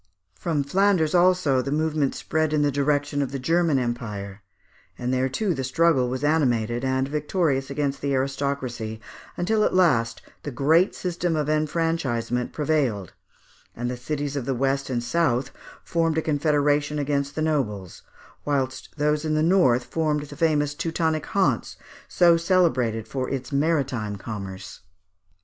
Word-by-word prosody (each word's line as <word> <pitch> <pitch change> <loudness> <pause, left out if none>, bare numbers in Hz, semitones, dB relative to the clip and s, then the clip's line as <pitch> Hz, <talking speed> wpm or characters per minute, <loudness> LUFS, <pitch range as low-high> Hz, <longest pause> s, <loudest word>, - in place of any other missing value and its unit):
From 155 - -1
Flanders, 185 +1 +2
also, 175 -7 +3
the 140 - -4
movement 155 -2 0
spread 155 -1 -1
in 150 -1 +2
the 145 - +2
direction 145 +1 0
of 135 -2 -2
the 140 - -3
German 165 +2 +2
Empire; 105 -5 -4 0.6
and 125 +1 -2
there, 130 +1 +1
too, 190 +7 0
the 135 -3 -3
struggle 135 -1 +2
was 130 +2 -4
animated, 120 -6 +1
and 130 0 0
victorious 150 -2 0
against 140 -1 -2
the 140 -1 0
aristocracy, 130 -5 -2 0.4
until 215 +5 +1
at - - +1
last 115 -11 +2 0.2
the - - -5
great 155 +7 +3
system 175 -2 -2
of 150 -1 -1
enfranchisement 150 -6 -1
prevailed; 140 - -1 0.6
and 120 +1 -3
the - - -3
cities 145 +3 -4
of 135 -4 -3
the 135 - -1
west 135 +2 0
and 120 -2 -1
south 130 -2 0 0.3
formed 165 -1 0
a 160 - +1
confederation 145 -1 +1
against 140 0 -1
the 155 - -2
nobles, 105 - -2 0.4
whilst 135 -3 -2
those 150 +1 +1
in 155 -1 0
the 155 - +2
north 160 -9 +4
formed 150 0 -1
the 145 - -10
famous 150 -3 +1
Teutonic 160 0 -1
Hanse, 195 -1 0 0.3
so 170 -2 +4
celebrated 130 - +1
for 130 -2 -3
its 135 -1 -4
maritime 140 -8 0
commerce. 100 -2 -7
145 Hz, 150 wpm, -24 LUFS, 130-160 Hz, 0.6 s, north